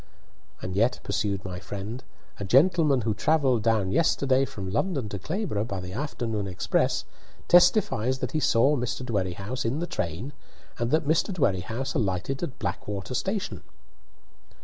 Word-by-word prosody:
"And 95 +1 -4
yet," 115 +5 +2
pursued 100 -2 -1
my 90 -1 -5
friend, 105 +7 -6 0.4
"a - - -3
gentleman 145 - +4
who 110 -1 0
travelled 130 +1 +2
down 105 -4 +1
yesterday 135 -4 +3
from 100 -6 -7
London 135 - 0
to 100 - -5
Clayborough 155 - -2
by 100 -4 -3
the 90 0 -6
afternoon 115 -5 -3
express 90 -2 0 0.4
testifies 155 - +4
that - - -3
he 155 - 0
saw 135 +1 +4
Mr. 125 0 -3
Dwerrihouse 100 +2 -2
in 115 +5 -1
the 170 - -1
train, 100 - -4 0.5
and 120 0 0
that 155 +2 +2
Mr. 160 +6 +2
Dwerrihouse 130 - -1
alighted 110 - -1
at 155 -7 -4
Blackwater 105 +4 -4
station." 195 - -2
120 Hz, 150 wpm, -27 LUFS, 100-145 Hz, 0.5 s, gentleman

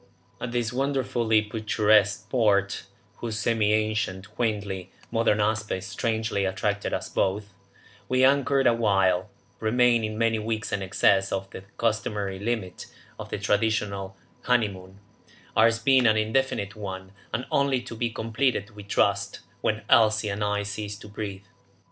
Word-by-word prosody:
At 125 - -3
this 120 -1 -1
wonderfully 125 -5 +1
picturesque 105 -1 +2
port, 100 -5 +1 0.3
whose 115 -2 -4
semi 110 -1 +1
ancient, 110 -2 -1
quaintly 100 -5 -2 0.2
modern 115 -2 +2
aspect 110 -2 0
strangely 110 +1 -1
attracted 100 +2 -1
us - - -2
both, 100 +1 -1 0.6
we 130 0 +4
anchored 135 0 +3
awhile, 95 -6 +2 0.3
remaining 115 -1 +2
many 115 -1 +2
weeks 110 0 -3
in 100 - -1
excess 95 +1 +2
of 95 0 -3
the 95 - -9
customary 105 -4 -1
limit 105 -4 -3 0.3
of - - -7
the - - -3
traditional 100 -2 -1 0.2
honeymoon, 100 -6 -1 0.6
ours 115 +1 +5
being 130 0 +4
an 110 -1 +4
indefinite 110 -3 0
one 95 -2 -7 0.2
and 120 +3 -2
only 140 -2 +2
to 125 -2 -8
be 120 +1 -1
completed 115 -1 -1
we 105 0 -11
trust, 100 0 0 0.2
when 110 +1 -1
Elsie 110 -3 +4
and 100 +1 -2
I 105 0 0
cease 100 0 -5
to 105 - -12
breathe. 100 -2 -6
110 Hz, 135 wpm, -26 LUFS, 100-115 Hz, 0.6 s, ours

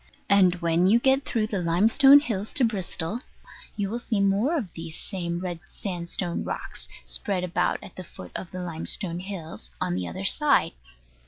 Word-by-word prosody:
And 190 -3 +5
when 170 +2 +3
you 215 +4 +6
get 265 +3 +2
through 220 -2 0
the 205 -4 -2
limestone 220 +11 +6
hills 215 -6 -3
to 270 - +1
Bristol, 200 -2 -1 0.6
you 205 -2 -1
will 230 +4 -3
see 225 -3 -1
more 200 +11 +2
of 210 - -4
these 165 -1 -6
same 175 -3 -3
red 175 -1 -4
sandstone 175 -2 -3
rocks, - - -5 0.2
spread 195 -4 -1
about 180 0 +1
at - - -12
the 185 - -6
foot 90 - -11
of 185 - -4
the 185 - -6
limestone 170 +1 -3
hills, 170 - -6
on - - -1
the 90 0 -2
other 190 - -5
side. 295 +6 +3
190 Hz, 175 wpm, -26 LUFS, 170-215 Hz, 0.6 s, you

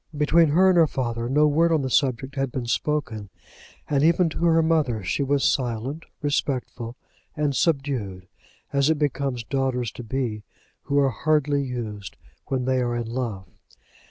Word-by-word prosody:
Between 160 +3 +4
her 175 +6 +4
and 185 -2 +4
her 165 -2 +6
father 120 -3 -3
no 150 +3 +4
word 165 +3 +3
on 155 -4 +2
the 130 - -2
subject 130 0 +1
had 135 -2 -2
been 125 -1 -4
spoken, 120 -5 -2 0.6
and 140 -2 +1
even 170 +1 +4
to 165 +2 -2
her 165 -1 +4
mother 150 -10 +1
she 95 - -1
was 140 0 +1
silent, 130 +5 -1 0.2
respectful, 130 -4 -2 0.4
and 145 -2 0
subdued, 130 - -1 0.5
as 140 +1 +3
it 160 - +2
becomes 140 -4 -1
daughters 125 -2 -1
to 120 - -9
be 115 -2 -3 0.4
who 140 -1 0
are 140 -2 +3
hardly 145 +3 +1
used 115 -7 -6 0.3
when 130 -2 -1
they 130 0 +1
are 120 -1 -1
in 120 0 -2
love. 115 -6 -4
135 Hz, 165 wpm, -24 LUFS, 120-150 Hz, 0.6 s, her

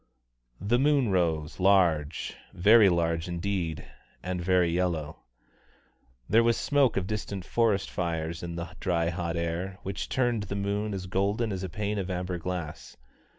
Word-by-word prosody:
The 110 +6 +1
moon 140 -4 +3
rose 80 -4 0
large, 90 -6 +2 0.2
very 105 +3 +6
large 85 -1 0
indeed, 85 -2 -2 0.4
and 90 0 -3
very 90 -2 +3
yellow. 85 -4 -1 1.1
There 110 +5 +5
was 115 0 +3
smoke 140 -6 +2
of 95 - 0
distant 100 -2 -4
forest 110 -4 +1
fires 85 -1 -3
in 85 -1 -5
the 85 0 -6
dry 85 -3 +1
hot 85 -1 -3
air, 85 +3 -3
which 95 0 -4
turned 120 -4 +1
the 100 -1 -4
moon 100 +1 -1
as 95 -1 -5
golden 100 +4 0
as 95 -1 -4
a 95 - -3
pane 105 +2 -2
of 95 -1 -3
amber 90 -1 -3
glass. 80 -8 -5
90 Hz, 150 wpm, -28 LUFS, 85-100 Hz, 1.1 s, very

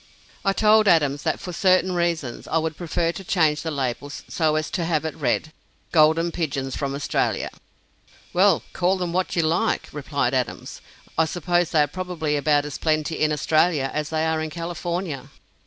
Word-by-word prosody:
I 195 - +3
told 215 +1 +4
Adams 145 -6 +3
that, - - -1
for 180 - -7
certain 185 0 +3
reasons, 170 -8 -2
I 165 - +1
would 160 -1 -1
prefer 170 0 -1
to 195 - -8
change 160 -5 +2
the 165 - -3
label 140 -1 -3
so 155 +2 -1
as 155 0 -1
to 175 - -1
have 160 -2 0
it 160 - -3
read: 150 +2 -1 0.4
"Golden 160 +1 +4
Pigeons 135 -6 -2
from 140 -1 -2
Australia." 145 - -1 0.8
"Well, 190 0 +4
call 185 +2 +1
them 180 -2 -3
what 185 +1 0
you 170 - +2
like," 170 +8 0
replied 140 -3 -1
Adams; 130 -2 -3 0.4
"I 160 - +5
suppose 175 +1 0
they 155 -2 +4
are - - -1
probably 170 -2 -3
about 145 0 +2
as 145 -2 -6
plenty 155 0 0
in 155 0 +3
Australia 150 -1 +2
as 150 0 -2
they 160 0 0
are 160 0 0
in 160 - -3
California." 170 -2 -4
160 Hz, 180 wpm, -23 LUFS, 150-175 Hz, 0.8 s, I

